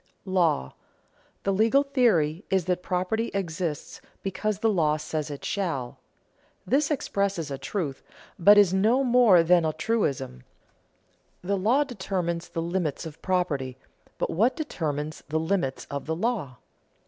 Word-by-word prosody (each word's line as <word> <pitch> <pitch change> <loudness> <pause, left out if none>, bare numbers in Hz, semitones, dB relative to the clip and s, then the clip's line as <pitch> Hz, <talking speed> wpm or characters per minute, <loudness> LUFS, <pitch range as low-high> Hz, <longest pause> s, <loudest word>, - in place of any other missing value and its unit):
[Sidenote: 185 - -6
Law] 160 - +2 0.7
The 195 - +1
legal 225 +8 +4
theory 205 - +2
is 190 -3 +1
that 180 -1 0
property 185 +6 -1
exists 170 -5 -3 0.2
because 200 +2 -2
the 225 - +1
law 155 -7 +2
says 155 0 -4
it 145 -1 -7
shall. 165 -11 -3 0.7
This 280 +9 +2
expresses 200 - -1
a 135 - -4
truth, 140 -1 -3 0.4
but 205 +4 +7
is 200 -3 +6
no 220 +8 +3
more 240 -9 +5
than 175 0 +4
a 160 - +1
truism. 150 - -1 1.0
The 200 +3 0
law 230 +9 +3
determines 185 -9 -3
the 165 - -3
limits 170 -3 -2
of 160 0 -9
property, 145 -9 -1 0.4
but - - -1
what 225 +10 +2
determines 155 - -3
the 160 +1 0
limits 160 -5 -1
of 140 0 -5
the 160 - -1
law? 180 - -2
180 Hz, 145 wpm, -26 LUFS, 155-205 Hz, 1.0 s, but